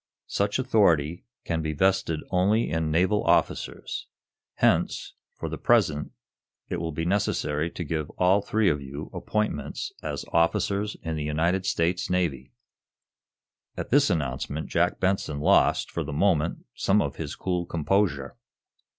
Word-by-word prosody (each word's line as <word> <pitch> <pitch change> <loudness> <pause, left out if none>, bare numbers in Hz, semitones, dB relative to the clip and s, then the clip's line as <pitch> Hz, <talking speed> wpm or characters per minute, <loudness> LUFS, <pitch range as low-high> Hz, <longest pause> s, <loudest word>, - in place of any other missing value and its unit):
Such 100 +1 0
authority 90 - +2 0.2
can 80 -1 -1
be 80 -1 -2
vested 95 -2 +1
only 95 +2 +2
in 80 0 0
naval 95 +6 +2
officers. - - 0 0.5
Hence, - - +1 0.2
for - - -5
the - - -5
present, 75 0 +2 0.6
it - - -2
will 80 -1 -3
be 80 +2 -3
necessary 85 -5 0
to 85 - -5
give 80 -1 -3
all 95 +3 +4
three 110 +1 +1
of 75 -5 +2
you 70 +3 -7
appointments 105 0 -2
as - - -4
officers 100 +4 +1
in 80 -2 -3
the 75 - -2
United 85 +5 0
States 85 +2 0
Navy." 80 -8 -1 1.3
At - - -5
this 140 0 +5
announcement 75 -2 -2
Jack - - +1
Benson 95 -6 0
lost, 75 - +3
for 85 - -2
the 75 - -6
moment, 80 0 +1
some 100 +2 +2
of 70 -5 -2
his 75 -3 -5
cool 90 -2 -2
composure. 85 -4 0
85 Hz, 140 wpm, -26 LUFS, 75-95 Hz, 1.3 s, this